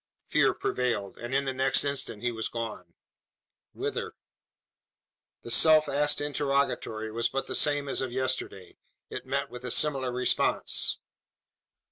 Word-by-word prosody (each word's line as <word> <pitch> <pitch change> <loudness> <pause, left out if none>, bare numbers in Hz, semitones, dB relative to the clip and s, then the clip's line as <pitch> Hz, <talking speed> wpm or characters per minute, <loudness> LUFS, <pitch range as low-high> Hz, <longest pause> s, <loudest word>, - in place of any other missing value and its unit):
Fear - - +3
prevailed; 115 -6 -2
and 120 +1 -6
in 140 0 +2
the 135 - -1
next 130 +1 +3
instant 140 -6 -3
he 120 - +1
was 110 -1 -3
gone. 115 -2 -6 0.8
Whither? - - -4 1.3
The 120 - -7
self 155 +6 +6
asked 145 +1 +2
interrogatory 140 -6 -1
was 115 +1 0
but 135 - -2
the - - -5
same 145 -1 +2
as 135 - 0
of 130 -2 -3
yesterday. 130 -7 -2 0.3
It - - -6
met 140 +1 -1
with 125 0 -9
a 125 - -4
similar 135 -1 +2
response. 125 +1 +1
130 Hz, 140 wpm, -28 LUFS, 120-140 Hz, 1.3 s, self